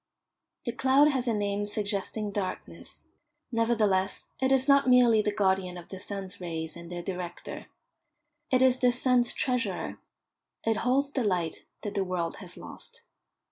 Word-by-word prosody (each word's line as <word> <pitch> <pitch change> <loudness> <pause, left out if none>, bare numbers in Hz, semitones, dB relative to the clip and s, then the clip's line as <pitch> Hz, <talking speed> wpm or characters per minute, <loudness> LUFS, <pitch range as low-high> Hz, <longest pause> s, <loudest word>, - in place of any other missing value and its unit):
The 240 - 0
cloud 265 +5 +4
has 260 -3 -1
a 230 - +2
name 205 0 -1
suggesting 205 0 -2
darkness; 195 -2 -4 0.4
nevertheless, 220 -5 +1
it 265 0 +2
is 265 0 +4
not 280 -2 +5
merely 240 -3 +6
the 210 - 0
guardian 190 -3 +1
of 175 - -11
the 190 - -7
sun's 190 -1 -5
rays 160 -2 -4
and 170 0 -9
their 175 -1 -5
director. 180 -1 -6 0.8
It 255 0 +4
is 255 -1 +4
the 250 -1 +4
sun's 250 -1 +4
treasurer; 235 -7 -1 0.7
it 225 -1 +2
holds 270 +5 +2
the 265 -3 0
light 180 -6 -1 0.2
that 205 - -3
the 200 -2 +1
world 180 -3 -2
has - - -10
lost. - - -10
210 Hz, 155 wpm, -28 LUFS, 185-250 Hz, 0.8 s, merely